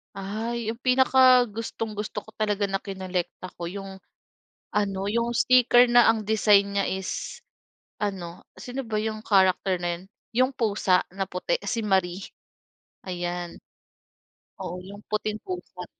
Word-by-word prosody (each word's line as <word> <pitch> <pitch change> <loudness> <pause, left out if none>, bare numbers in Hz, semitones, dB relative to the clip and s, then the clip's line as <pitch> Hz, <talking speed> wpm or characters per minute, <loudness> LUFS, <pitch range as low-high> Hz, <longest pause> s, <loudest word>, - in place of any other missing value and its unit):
Ay, 220 +3 -3
'yong 230 - -10
pinakagustong-gusto 245 -5 +2
ko 220 - -15
talaga 210 -1 0
na 195 - 0
kinolekta 185 -2 -4
ko 170 - -3
yung 195 +1 -7 0.7
ano, 200 -2 0
'yong 235 +2 0
sticker 245 0 +5
na 240 -1 +7
ang 225 -1 +3
design 205 -1 +4
niya 200 - +1
is 190 -1 -4 0.6
ano, 185 -4 -4 0.2
sino 255 +2 -5
ba 220 - -5
'yong 215 0 -3
character 190 -1 +3
na 175 -1 -1
yun? - - -15 0.3
'Yong 255 +3 +3
pusa 200 -5 +2
na 195 0 -2
puti, 185 - -1
si 230 - -1
Marie. 190 -2 0 0.8
Ayan. 175 -1 -4 1.0
Oo, 175 - -5
'yong 200 +2 -11
puting 215 0 -1
pusa. 180 0 -6
205 Hz, 130 wpm, -26 LUFS, 190-225 Hz, 1.0 s, na